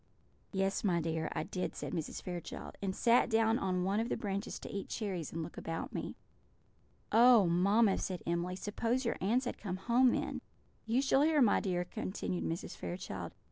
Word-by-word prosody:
"Yes, 195 0 0
my 180 -5 +2
dear, 160 -1 -1
I - - -1
did," 185 - -4
said - - -5
Mrs. 160 -3 -4
Fairchild; 175 -2 -6
"and 190 -1 -2
sat 235 0 +4
down 225 0 +3
on 185 -2 0
one 195 +3 +1
of 230 +2 -1
the - - -1
branches 200 0 -3
to - - -7
eat 200 -1 -5
cherries 190 -8 -3
and 165 0 -3
look 165 - -7
about 165 0 -4
me." - - -4 1.0
"Oh, 235 -2 +7
mamma!" 195 +5 +3
said 185 -2 -4
Emily, 170 +2 -1
"suppose 230 +6 -1
your 230 - 0
aunts 235 +7 +2
had 245 - -4
come 185 -3 -4
home 240 +6 +4
then!" - - -1 0.5
"You 245 +4 +2
shall 270 0 +4
hear, 310 0 +4
my 240 -6 +5
dear," 180 -2 -1
continued 180 0 -3
Mrs. 165 +2 -4
Fairchild. 180 +2 -6
195 Hz, 185 wpm, -33 LUFS, 180-230 Hz, 1.0 s, Oh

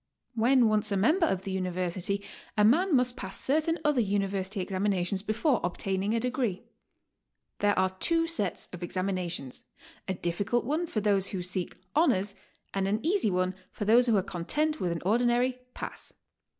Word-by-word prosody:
When 240 +1 +4
once 215 -1 +2
a 200 - +1
member 320 - +3
of 190 -6 -1
the 195 - -4
University, 185 +1 -2 0.3
a 210 - +5
man 325 - +4
must 250 -1 +2
pass 195 -6 -6
certain 315 +4 +1
other 295 -5 +3
University 195 -1 -1
exanninations 190 -1 0
before 230 +5 +1
obtaining 195 +4 -1
a - - +2
degree. 245 -5 -1 1.0
There 205 0 +2
are 185 0 +2
two 330 -1 +3
sets 270 - -2
of 180 - -8
examinations, 175 -6 -3 0.2
— - - -23
a 190 - 0
difflcult 195 +8 -1
one 310 +6 -1
for 215 - -2
those 200 -2 +2
who 185 -2 -4
seek 180 0 -2 0.2
"honors," 205 - +3 0.4
and 195 -1 0
an 210 +7 -1
easy 365 - +2
one 185 0 0 0.2
for 210 - -4
those 240 +4 +5
who 225 -3 +4
are 190 - +1
content 300 - -1
with 175 - -1
an 170 - -4
ordinary 245 +4 +2 0.2
"pass." - - -7
205 Hz, 170 wpm, -29 LUFS, 185-250 Hz, 1.0 s, a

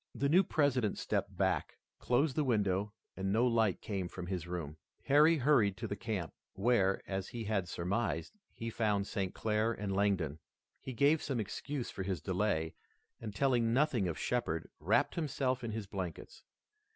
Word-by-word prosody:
The 140 - +1
new 175 +5 +6
President 135 - +1
stepped - - -2
back, - - 0 0.2
closed 130 +3 +2
the 155 - +2
window 105 -5 +1 0.2
and 95 0 -2
no 115 +4 +3
light 115 -5 +2
came 95 -4 -3
from 90 0 -7
his 90 -2 -3
room. 80 -4 -5 0.3
Harry 150 +4 +5
hurried 120 -8 +3
to - - -4
the 100 - -3
camp, 100 -8 -3 0.2
where, 95 -2 +2
as 95 -1 -3
he 120 -1 -5
had 100 -4 -1
surmised, 90 -2 -2 0.2
he 115 0 -5
found 105 -3 +1
St. 95 -2 -3
Clair 110 +1 +1
and 105 -4 -3
Langdon. 95 -7 +1 0.4
He 130 - -6
gave 145 +6 +4
some 135 -4 -2
excuse 130 +5 -4
for - - -6
his 95 -2 -2
delay, 90 -2 0 0.5
and 110 -3 -7
telling 120 -3 +2
nothing 130 -8 +2
of 85 - -3
Shepard, 120 -10 -1
wrapped - - +2
himself 135 -5 -1
in 115 - -3
his 110 -1 -4
blankets. 95 -3 -6
105 Hz, 170 wpm, -33 LUFS, 95-125 Hz, 0.5 s, new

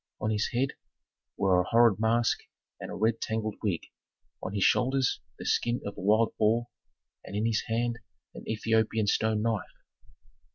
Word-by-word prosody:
On 105 +1 -1
his 105 -1 +1
head 130 +2 0 0.7
were 95 -2 +3
a 90 - -5
horrid 115 -3 +5
mask 115 +1 +2 0.4
and - - -7
a - - -5
red 110 +2 +1
tangled 110 -1 -2
wig, 95 -7 0 0.6
on 95 - -5
his 100 - +1
shoulders 130 0 +2 0.2
the - - -8
skin 120 +1 +1
of 100 - -5
a - - -8
wild 110 +3 +3
boar, 115 +3 +2 0.5
and 100 - -8
in 105 +2 0
his 110 -2 +1
hand 120 +1 -1 0.3
an - - -9
Ethiopian 110 0 +1
stone 110 +1 +1
knife. 110 -3 -3
110 Hz, 165 wpm, -29 LUFS, 105-115 Hz, 0.7 s, horrid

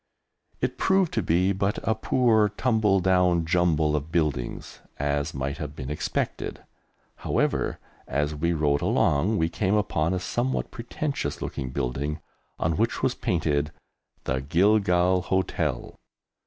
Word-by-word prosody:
It - - -2
proved 190 -3 +2
to 110 - +1
be 90 +2 +2
but 100 +1 0
a 110 - +4
poor 110 -1 +3
tumble 105 -3 +2
down 90 -2 +3
jumble 80 -3 +2
of 75 +2 -3
buildings, 75 -8 -2 0.2
as 70 +2 -1
might 70 +1 -3
have 75 -1 -5
been 65 +2 -5
expected. 75 - -3 0.5
However, - - 0 0.3
as 75 +3 0
we 80 +3 0
rode 75 -3 +1
along, 95 +10 +2
we 80 - +2
came 95 +4 0
upon 95 -4 +1
a - - -1
somewhat 120 +8 -2
pretentious 140 +4 -3
looking 65 - -4
building 70 +3 -2 0.4
on 80 0 0
which 115 +3 0
was 130 - +2
painted 75 -6 0 0.5
"The 65 +1 -1
Gilgal 90 +3 +3
Hotel." 95 0 -2
85 Hz, 135 wpm, -26 LUFS, 75-105 Hz, 0.5 s, a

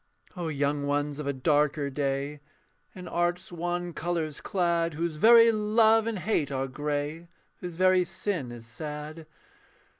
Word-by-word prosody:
O 175 -2 -4
young 145 -1 -1
ones 145 0 -1
of 150 - -4
a - - +2
darker 145 +1 +1
day, 140 +1 -2 0.6
In 180 -1 -8
art's 175 +2 -1
wan 175 0 -3
colours 160 -2 -3
clad, 170 -3 0
Whose 165 -1 -2
very 230 +5 +7
love 220 +1 +3
and 230 -2 -2
hate 180 -6 0
are 135 0 -1
grey 145 +4 -3 0.3
Whose 175 -2 -7
very 185 +1 +4
sin 180 -7 -3
is 120 -1 -10
sad. 150 +6 -7
160 Hz, 145 wpm, -28 LUFS, 145-180 Hz, 0.6 s, very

